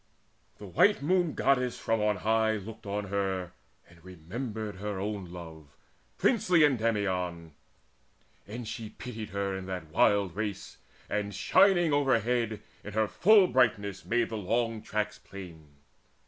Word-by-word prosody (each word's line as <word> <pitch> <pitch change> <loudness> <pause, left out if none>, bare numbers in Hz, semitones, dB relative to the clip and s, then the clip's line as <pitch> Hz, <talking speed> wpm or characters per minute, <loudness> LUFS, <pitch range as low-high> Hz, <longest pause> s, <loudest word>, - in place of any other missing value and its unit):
The 105 - -10
white 140 - +3
Moon 175 0 +2
goddess 125 -2 +1
from 115 -1 0
on 105 0 +2
high 110 0 +3
Looked 105 0 -7
on 100 0 -3
her, 95 -3 -2 0.4
and 85 -1 -20
remembered 105 +4 -6
her 100 0 -4
own 100 -1 -3
love, 80 -5 -11 0.4
Princely 185 -9 +3
Endymion, 95 - 0 0.9
and 115 +2 -6
she 110 0 -6
pitied 110 -1 -7
her 100 -1 -2
In 95 0 -6
that 90 -5 -6
wild 100 +1 +3
race, 105 -2 -5 0.3
and, 105 -1 -2
shining 175 - +4
overhead 120 -5 +1 0.2
In 105 - -8
her 110 0 +2
full 205 - +5
brightness, 105 - +1
made 120 0 0
the 110 - -4
long 115 +2 -1
tracks 105 0 -3
plain. 85 -6 -11
105 Hz, 135 wpm, -29 LUFS, 95-120 Hz, 0.9 s, full